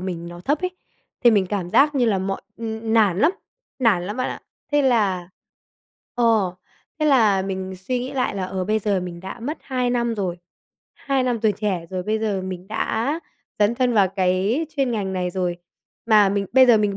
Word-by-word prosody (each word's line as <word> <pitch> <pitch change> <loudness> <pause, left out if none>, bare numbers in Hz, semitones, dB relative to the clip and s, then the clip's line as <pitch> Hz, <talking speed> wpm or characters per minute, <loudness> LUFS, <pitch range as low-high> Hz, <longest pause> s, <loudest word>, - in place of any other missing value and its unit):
mình 175 -2 -5
nó 175 0 -9
thấp 285 +10 0
ấy, 365 - 0 0.5
thì 240 - +8
mình 200 -4 +3
cảm 185 -2 -3
giác 290 +7 +4
như 260 -3 +2
là 205 -4 +2
mọi 195 +1 -3 0.2
ưm, 220 -1 -4
ưm, 220 0 -3
nản 205 -6 +4
lắm, 300 +10 +5 0.5
nản 210 -9 +2
lắm 205 +3 -4
bạn 255 - -1
ạ. - - -6 0.3
Thế 290 0 +4
là 205 -9 +1 0.9
ờ, 225 -6 +2 0.4
thế 305 - +1
là 220 -9 +4
mình 190 -1 -4
suy 190 +8 -2
nghĩ 250 +2 -5
lại 255 -5 -1
là, 195 -2 -2
ờ, 185 0 -3
bây 215 +3 +1
giờ 200 -2 0
mình 175 -1 -7
đã 190 +6 -8
mất 290 +7 -4
2 250 -2 -1
năm 235 -1 0
rồi. 185 -5 -3 0.6
Hai 275 -2 -1
năm 245 -3 0
tuổi 215 -1 +3
trẻ 190 -4 -2
rồi 185 -1 -3
bây 215 +4 -1
giờ 210 -3 -1
mình 185 0 -6
đã 230 +7 -1 0.4
dấn 210 +2 +3
thân 250 0 +1
vào 200 -3 +4
cái 190 - +1
chuyên 270 -3 +1
ngành 200 -5 -2
này 180 -1 -1
rồi, 180 -1 -2 0.5
mà 210 -3 +6
mình 200 0 -1
bây 260 +1 +7
giờ 240 -2 +7
mình 205 -2 0
210 Hz, 210 wpm, -22 LUFS, 185-245 Hz, 0.9 s, thì